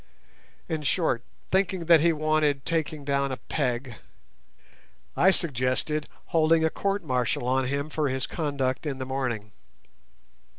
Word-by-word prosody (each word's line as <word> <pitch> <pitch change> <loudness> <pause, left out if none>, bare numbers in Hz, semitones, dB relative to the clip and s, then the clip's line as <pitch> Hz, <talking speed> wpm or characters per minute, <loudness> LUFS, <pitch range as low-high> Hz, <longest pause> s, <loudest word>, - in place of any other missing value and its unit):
In 160 -3 -2
short, 150 -5 +1 0.3
thinking 190 -2 +1
that 165 -2 +7
he 170 +1 +4
wanted 155 -3 +1
taking 155 -3 -2
down 140 -1 +1
a 130 - -3
peg, 125 -5 -2 1.2
I 190 - +5
suggested 150 -2 0 0.2
holding 160 0 +3
a 160 - +1
court 200 -1 -1
martial 125 -3 0
on 130 +1 +2
him 140 +3 -2
for 150 -2 0
his 130 0 -1
conduct 140 -3 -2
in 140 -2 -2
the 130 - -4
morning. 125 -6 -3
145 Hz, 135 wpm, -27 LUFS, 130-160 Hz, 1.2 s, that